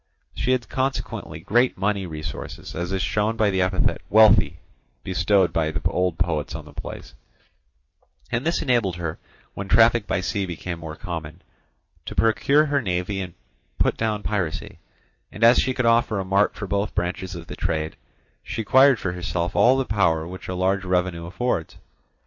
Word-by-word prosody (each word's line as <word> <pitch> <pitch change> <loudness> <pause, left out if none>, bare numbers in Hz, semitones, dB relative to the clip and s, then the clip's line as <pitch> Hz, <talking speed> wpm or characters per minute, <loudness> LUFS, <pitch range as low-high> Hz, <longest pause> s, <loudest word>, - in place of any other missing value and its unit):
She 130 - 0
had 125 -2 -1
consequently 130 +1 -3
great 120 +4 +2
money 100 0 -1
resources, 75 -3 -7
as 85 +2 -4
is 95 -1 -1
shown 105 +1 0
by 110 -3 +3
the 95 -1 +1
epithet 95 +1 +1
"wealthy" 105 -5 +5 0.5
bestowed 95 0 +2
by 80 -1 +1
the 80 +1 -3
old 90 -2 0
poets 80 -4 -1
on 75 -2 -7
the 75 - -14
place, - - -8 1.2
and 120 +2 0
this 170 +3 0
enabled 120 - +1
her, 85 -3 -4 0.3
when 100 - -6
traffic 115 +1 +4
by - - 0
sea 95 +1 -2
became 85 0 -5
more 80 -1 -7
common, 80 -2 -7 0.6
to - - -5
procure 140 +7 +3
her 145 -2 +1
navy 95 -1 -2
and 90 -3 -7 0.4
put - - +2
down 110 -2 -2
piracy; 95 -7 -3 0.5
and 105 - -5
as 120 +2 +7
she 130 - +1
could 125 -1 -1
offer 115 -2 +3
a 95 - -3
mart 100 +2 +2
for 105 - -5
both 100 +1 -2
branches 90 +1 -2
of 85 -1 -8
the - - -8
trade, 80 0 -2 0.5
she 115 +1 -4
acquired 130 +4 +6
for 90 - -3
herself 90 0 -3
all 120 +6 +5
the 135 - 0
power 85 -7 +1
which 95 +1 -9
a 90 - -3
large 95 +1 +1
revenue 90 -2 -1
affords. 95 -2 -2
95 Hz, 175 wpm, -23 LUFS, 85-110 Hz, 1.2 s, as